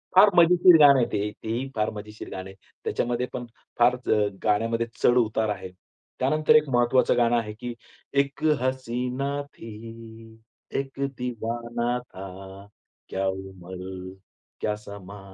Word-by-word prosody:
फार 200 Hz, +3 st, +9 dB
मजेशीर 175 Hz, 0 st, +7 dB
गाणं 140 Hz, -2 st, +8 dB
आहे 120 Hz, -, +3 dB
ते. 105 Hz, 0 st, -1 dB
तेही 115 Hz, +4 st, -2 dB
फार 110 Hz, -1 st, +1 dB
मजेशीर 105 Hz, +1 st, -8 dB
गाणं 95 Hz, 0 st, -6 dB
आहे. 95 Hz, -, -12 dB, 0.3 s
त्याच्यामध्ये 120 Hz, +1 st, 0 dB
पण 120 Hz, -, -4 dB, 0.3 s
फार 120 Hz, +1 st, +5 dB
अ, 110 Hz, -4 st, +1 dB, 0.2 s
गाण्यामध्ये 115 Hz, +2 st, +1 dB, 0.2 s
चढ-उतार 110 Hz, -3 st, +3 dB
आहे. 100 Hz, -2 st, -4 dB, 0.5 s
त्यानंतर 155 Hz, +4 st, +3 dB
एक 150 Hz, -2 st, +5 dB
महत्वाचं 120 Hz, 0 st, +3 dB
गाणं 120 Hz, 0 st, +3 dB
आहे, 105 Hz, -2 st, -2 dB
की 120 Hz, +2 st, -6 dB, 0.5 s
"इक 140 Hz, +2 st, -12 dB, 0.2 s
हसीना 130 Hz, +1 st, -2 dB, 0.2 s
थी, 115 Hz, 0 st, -11 dB, 0.4 s
इक 135 Hz, 0 st, -6 dB, 0.2 s
दीवाना 120 Hz, 0 st, -2 dB
था, 95 Hz, -3 st, -10 dB, 0.4 s
क्या 95 Hz, +1 st, -1 dB
उमर, 95 Hz, -1 st, -6 dB, 0.5 s
क्या 105 Hz, -, 0 dB
समा, 100 Hz, -1 st, -10 dB
115 Hz, 130 wpm, -26 LUFS, 105-125 Hz, 0.5 s, फार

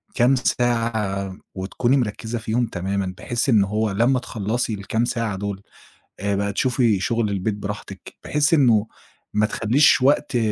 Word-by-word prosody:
كام 125 Hz, +3 st, +4 dB
ساعة 115 Hz, -6 st, -1 dB, 0.2 s
وتكُوني 110 Hz, +8 st, 0 dB
مركّزة 115 Hz, 0 st, -2 dB
فيهم 115 Hz, +2 st, 0 dB
تمامًا، 95 Hz, -1 st, -3 dB
بحيث 120 Hz, +3 st, -2 dB
إن 110 Hz, -4 st, +5 dB
هو 105 Hz, +1 st, -1 dB
لما 120 Hz, +6 st, +2 dB
تخلّصي 115 Hz, 0 st, -2 dB
الكام 110 Hz, +4 st, -1 dB
ساعة 115 Hz, -5 st, -2 dB
دول، 100 Hz, 0 st, -4 dB, 0.6 s
آآ، 100 Hz, 0 st, -1 dB
بقى 100 Hz, 0 st, -1 dB
تشوفي 120 Hz, -3 st, +2 dB
شغل 115 Hz, +2 st, 0 dB
البيت 100 Hz, +2 st, -1 dB
براحتِك، 100 Hz, -1 st, -7 dB
بحيث 150 Hz, +1 st, +1 dB
إنه 115 Hz, -8 st, +4 dB, 0.5 s
ما 105 Hz, +1 st, +3 dB
تخلّيش 120 Hz, +7 st, +3 dB
وقت 140 Hz, -1 st, +2 dB
110 Hz, 145 wpm, -22 LUFS, 100-120 Hz, 0.6 s, إن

